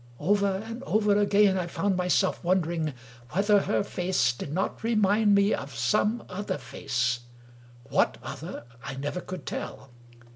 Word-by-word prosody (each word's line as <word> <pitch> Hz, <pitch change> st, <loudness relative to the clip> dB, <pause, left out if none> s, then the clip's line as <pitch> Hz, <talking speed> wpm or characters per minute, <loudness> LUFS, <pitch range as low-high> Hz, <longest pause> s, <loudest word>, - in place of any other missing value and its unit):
Over 200 Hz, -, +1 dB
and 230 Hz, +2 st, -6 dB
over 210 Hz, -1 st, +3 dB
again, 200 Hz, -1 st, +4 dB
I 175 Hz, -, -2 dB
found 195 Hz, +3 st, 0 dB
my 180 Hz, 0 st, -1 dB
self 190 Hz, +1 st, +2 dB
wondering 170 Hz, -4 st, 0 dB, 0.4 s
whether 205 Hz, +3 st, +4 dB
her -, -, 0 dB
face 180 Hz, -10 st, +1 dB
did 130 Hz, +4 st, -7 dB
not 190 Hz, +7 st, -2 dB
remind 210 Hz, -2 st, +3 dB
me 200 Hz, +1 st, +4 dB
of 140 Hz, -3 st, -4 dB
some 210 Hz, -, +1 dB
other 185 Hz, 0 st, -3 dB
face 125 Hz, -3 st, -1 dB, 0.3 s
— 120 Hz, 0 st, -23 dB
what -, -, +2 dB
other -, -, -7 dB, 0.2 s
I -, -, -5 dB
never 145 Hz, +6 st, -3 dB
could 180 Hz, -7 st, -7 dB
tell. 135 Hz, -1 st, -6 dB
185 Hz, 155 wpm, -27 LUFS, 145-205 Hz, 0.4 s, again